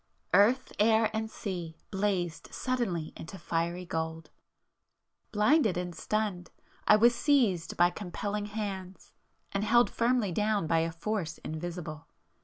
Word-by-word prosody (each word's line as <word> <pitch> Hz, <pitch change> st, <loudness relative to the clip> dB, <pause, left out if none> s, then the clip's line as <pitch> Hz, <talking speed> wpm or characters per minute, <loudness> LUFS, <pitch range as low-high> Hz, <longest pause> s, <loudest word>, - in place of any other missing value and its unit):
Earth, 245 Hz, +6 st, +4 dB
air, 220 Hz, +1 st, +4 dB
and 220 Hz, 0 st, -2 dB
sea 175 Hz, -7 st, -5 dB
blazed 190 Hz, -4 st, -1 dB
suddenly 215 Hz, -12 st, -2 dB
into 180 Hz, +4 st, -8 dB
fiery 170 Hz, +1 st, -2 dB
gold,—blinded 180 Hz, -, -2 dB
and 180 Hz, -1 st, -3 dB
stunned, 185 Hz, +1 st, -2 dB, 0.4 s
I 210 Hz, -, +8 dB
was 235 Hz, +3 st, +5 dB
seized 235 Hz, -, +2 dB
by 175 Hz, +1 st, +5 dB
compelling 205 Hz, +2 st, -4 dB
hands 195 Hz, -3 st, -6 dB, 0.4 s
and 200 Hz, +1 st, -1 dB
held 240 Hz, +3 st, +4 dB
firmly 235 Hz, -4 st, +1 dB
down 210 Hz, 0 st, +1 dB
by 165 Hz, +1 st, +2 dB
a 165 Hz, +1 st, 0 dB
force 170 Hz, 0 st, -3 dB
invisible 160 Hz, -1 st, -6 dB
195 Hz, 120 wpm, -30 LUFS, 170-220 Hz, 0.4 s, I